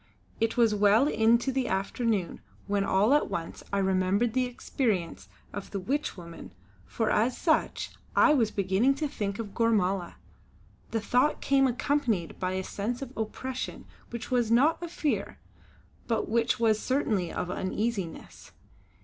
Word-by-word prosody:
It 225 Hz, +1 st, 0 dB
was 230 Hz, -3 st, +4 dB
well 210 Hz, +6 st, +4 dB
into 235 Hz, +1 st, +3 dB
the 265 Hz, -1 st, -1 dB
afternoon 200 Hz, 0 st, -1 dB, 0.2 s
when 200 Hz, 0 st, 0 dB
all 200 Hz, +6 st, +3 dB
at 295 Hz, -, +2 dB
once 165 Hz, -1 st, -5 dB
I 200 Hz, -, 0 dB
remembered 190 Hz, +4 st, +1 dB
the 255 Hz, 0 st, +1 dB
existence 220 Hz, -7 st, -2 dB, 0.2 s
of 205 Hz, -, -6 dB
the 200 Hz, -, -3 dB
witch 275 Hz, +6 st, -2 dB
woman 170 Hz, -, -10 dB, 0.3 s
for 225 Hz, -2 st, -1 dB
as 235 Hz, +4 st, +2 dB
such 315 Hz, -3 st, 0 dB, 0.2 s
I 305 Hz, -, +6 dB
was 235 Hz, -7 st, +3 dB
beginning 200 Hz, +7 st, +2 dB
to 300 Hz, +2 st, -1 dB
think 205 Hz, -8 st, -3 dB
of 210 Hz, -4 st, -6 dB
Gormala. 195 Hz, -6 st, +1 dB, 0.7 s
The 225 Hz, -, -1 dB
thought 250 Hz, +7 st, +2 dB
came 270 Hz, -1 st, +3 dB
accompanied 240 Hz, -, -1 dB
by 185 Hz, 0 st, -1 dB
a 190 Hz, 0 st, -2 dB
sense 235 Hz, +7 st, -3 dB
of 265 Hz, 0 st, -10 dB
oppression 255 Hz, +4 st, -4 dB, 0.2 s
which 235 Hz, +1 st, -7 dB
was 240 Hz, -3 st, +2 dB
not 275 Hz, +9 st, +3 dB
of 345 Hz, -, -5 dB
fear, 305 Hz, -4 st, -2 dB, 0.7 s
but 225 Hz, -2 st, 0 dB
which 230 Hz, +2 st, +1 dB
was 220 Hz, -2 st, +3 dB
certainly 215 Hz, -, 0 dB
of 180 Hz, -, -3 dB
uneasiness. 190 Hz, -1 st, -4 dB
225 Hz, 150 wpm, -28 LUFS, 195-255 Hz, 0.7 s, I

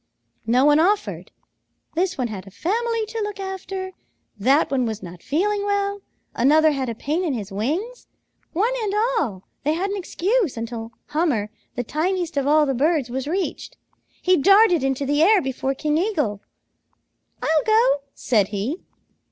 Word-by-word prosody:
"No 250 Hz, +4 st, +4 dB
one 295 Hz, +1 st, +5 dB
offered. 400 Hz, +5 st, 0 dB, 0.6 s
This 365 Hz, +2 st, 0 dB
one 255 Hz, -2 st, 0 dB
had 195 Hz, -3 st, -7 dB
a -, -, -8 dB
family 450 Hz, -, -1 dB
to 450 Hz, +1 st, -5 dB
look 415 Hz, -1 st, -5 dB
after. 380 Hz, 0 st, -5 dB, 0.4 s
That 265 Hz, +10 st, +2 dB
one 255 Hz, -3 st, +1 dB
was 220 Hz, -2 st, -5 dB
not 175 Hz, -1 st, -9 dB
feeling 405 Hz, +7 st, 0 dB
well. 405 Hz, 0 st, -1 dB, 0.3 s
Another 310 Hz, +5 st, +4 dB
had 270 Hz, -3 st, -2 dB
a 230 Hz, -, -4 dB
pain 305 Hz, +10 st, -1 dB
in 305 Hz, -7 st, -1 dB
his 205 Hz, -3 st, -6 dB
wings. 320 Hz, -, -3 dB, 0.4 s
One 430 Hz, +9 st, +1 dB
and 415 Hz, -2 st, -1 dB
all 420 Hz, -, 0 dB, 0.2 s
they 300 Hz, +2 st, +2 dB
had 380 Hz, +5 st, -1 dB
an 405 Hz, -, -2 dB
excuse 385 Hz, -, 0 dB
until 230 Hz, 0 st, -5 dB, 0.2 s
Hummer, 295 Hz, -10 st, 0 dB, 0.2 s
the 245 Hz, -, -2 dB
tiniest 340 Hz, -, -1 dB
of 280 Hz, -1 st, 0 dB
all 305 Hz, +1 st, +5 dB
the 270 Hz, -, 0 dB
birds, 285 Hz, -1 st, +1 dB
was 265 Hz, +2 st, -3 dB
reached. 370 Hz, +4 st, -3 dB, 0.5 s
He 365 Hz, 0 st, +4 dB
darted 390 Hz, -1 st, +5 dB
into 270 Hz, +1 st, 0 dB
the 290 Hz, +2 st, +1 dB
air 405 Hz, +5 st, +6 dB
before 265 Hz, -2 st, -2 dB
King 300 Hz, +2 st, 0 dB
Eagle. 300 Hz, -, -1 dB, 1.0 s
'I'll 310 Hz, -1 st, +2 dB
go,' 440 Hz, -, +4 dB
said 210 Hz, -6 st, +2 dB
he. 215 Hz, -, -3 dB
310 Hz, 165 wpm, -22 LUFS, 255-390 Hz, 1.0 s, air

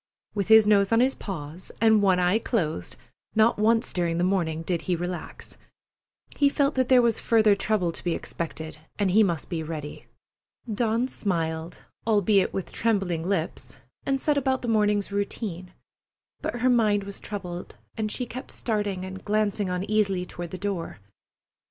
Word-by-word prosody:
With 200 Hz, -3 st, -1 dB
his 220 Hz, -1 st, +8 dB
nose 200 Hz, -1 st, +4 dB
on 225 Hz, -, +4 dB
his 260 Hz, +2 st, +3 dB
paws 165 Hz, -2 st, -7 dB
and 220 Hz, -1 st, +5 dB
one 190 Hz, -2 st, +4 dB
eye 180 Hz, +4 st, +3 dB
closed, 160 Hz, -, -2 dB, 0.4 s
not 220 Hz, 0 st, +4 dB
once 225 Hz, +1 st, +2 dB
during 170 Hz, -2 st, 0 dB
the 175 Hz, -, +1 dB
morning 170 Hz, -4 st, 0 dB
did 170 Hz, 0 st, -1 dB
he 180 Hz, -, +3 dB
relax. 175 Hz, +1 st, -6 dB, 0.8 s
He 285 Hz, -1 st, +4 dB
felt 280 Hz, +1 st, +1 dB
that 260 Hz, -1 st, 0 dB
there 255 Hz, -2 st, +6 dB
was 230 Hz, -2 st, +2 dB
further 220 Hz, -2 st, +4 dB
trouble 200 Hz, -3 st, +1 dB
to -, -, -8 dB
be 175 Hz, -2 st, 0 dB
expected, 160 Hz, -2 st, -6 dB, 0.2 s
and 200 Hz, -3 st, +1 dB
he 215 Hz, +4 st, +5 dB
must 170 Hz, -7 st, 0 dB
be 170 Hz, -3 st, -3 dB
ready. 155 Hz, -2 st, -7 dB, 0.7 s
Dawn 230 Hz, +3 st, +1 dB
smiled, 165 Hz, -6 st, -3 dB, 0.2 s
albeit 205 Hz, -2 st, +3 dB
with 190 Hz, -, -4 dB
trembling 195 Hz, -7 st, 0 dB
lips, 175 Hz, -1 st, -3 dB, 0.3 s
and 270 Hz, 0 st, 0 dB
set 290 Hz, +1 st, +2 dB
about 265 Hz, -1 st, 0 dB
the -, -, -3 dB
morning's 210 Hz, -3 st, +2 dB
routine; 200 Hz, -3 st, -3 dB, 0.7 s
but 240 Hz, -, -3 dB
her 255 Hz, -, +4 dB
mind 210 Hz, -4 st, +3 dB
was 200 Hz, 0 st, -8 dB
troubled, 180 Hz, -4 st, -6 dB, 0.2 s
and 215 Hz, -1 st, -2 dB
she 250 Hz, -, -2 dB
kept 255 Hz, +2 st, -8 dB
starting 205 Hz, -5 st, -2 dB
and 190 Hz, 0 st, -8 dB
glancing 210 Hz, -2 st, 0 dB
uneasily 195 Hz, 0 st, 0 dB
toward 175 Hz, -1 st, -7 dB
the 185 Hz, -, -6 dB
door. 190 Hz, -3 st, -3 dB
200 Hz, 165 wpm, -26 LUFS, 175-220 Hz, 0.8 s, his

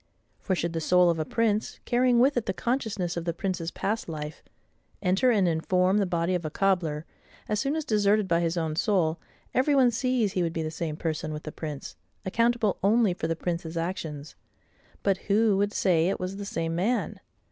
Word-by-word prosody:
For 190 Hz, -, -1 dB
should 170 Hz, -1 st, -2 dB
the 165 Hz, -, -2 dB
soul 180 Hz, +1 st, +4 dB
of 165 Hz, -, -3 dB
a 155 Hz, -, -1 dB
prince, 220 Hz, +2 st, 0 dB
carrying 245 Hz, 0 st, +3 dB
with 270 Hz, +4 st, +4 dB
it 240 Hz, -, -1 dB
the 190 Hz, -, -1 dB
consciousness 220 Hz, -8 st, -1 dB
of 170 Hz, -, -2 dB
the 170 Hz, -1 st, -2 dB
prince's 180 Hz, -3 st, -2 dB
past 210 Hz, +2 st, -3 dB
life, 150 Hz, -1 st, -6 dB, 0.6 s
enter 190 Hz, +8 st, +3 dB
and 205 Hz, -6 st, +3 dB
inform 180 Hz, +4 st, +2 dB
the 200 Hz, -, +1 dB
body 170 Hz, 0 st, 0 dB
of 175 Hz, -1 st, -1 dB
a 155 Hz, -, -2 dB
cobbler, 165 Hz, -4 st, 0 dB, 0.4 s
as 210 Hz, -1 st, 0 dB
soon 275 Hz, +5 st, 0 dB
as 315 Hz, -2 st, -2 dB
deserted 210 Hz, -3 st, +2 dB
by 170 Hz, -2 st, +2 dB
his 170 Hz, 0 st, 0 dB
own 160 Hz, -2 st, -1 dB
soul, 170 Hz, -4 st, +1 dB, 0.3 s
every 275 Hz, +3 st, +3 dB
one 255 Hz, -3 st, +5 dB
sees 240 Hz, -3 st, +1 dB
he 185 Hz, -, 0 dB
would 165 Hz, -1 st, -1 dB
be 165 Hz, -, -2 dB
the 155 Hz, -, -3 dB
same 160 Hz, -2 st, -4 dB
PERSON 155 Hz, -1 st, -3 dB
with 150 Hz, 0 st, -6 dB
the 155 Hz, -, -6 dB
prince, 150 Hz, -3 st, -6 dB, 0.3 s
accountable 230 Hz, +1 st, +1 dB
only 210 Hz, 0 st, +3 dB
for 160 Hz, -, -3 dB
the 165 Hz, -, -1 dB
prince's 170 Hz, -1 st, -4 dB
actions: 160 Hz, -4 st, -4 dB, 0.7 s
but 195 Hz, -1 st, +2 dB
who 210 Hz, 0 st, +4 dB
would 205 Hz, +1 st, +1 dB
say 175 Hz, -4 st, +2 dB
it 195 Hz, -, -2 dB
was 185 Hz, +2 st, -4 dB
the 200 Hz, -, -5 dB
same 165 Hz, -4 st, -2 dB
MAN? 205 Hz, +9 st, -1 dB
185 Hz, 205 wpm, -27 LUFS, 165-215 Hz, 0.7 s, one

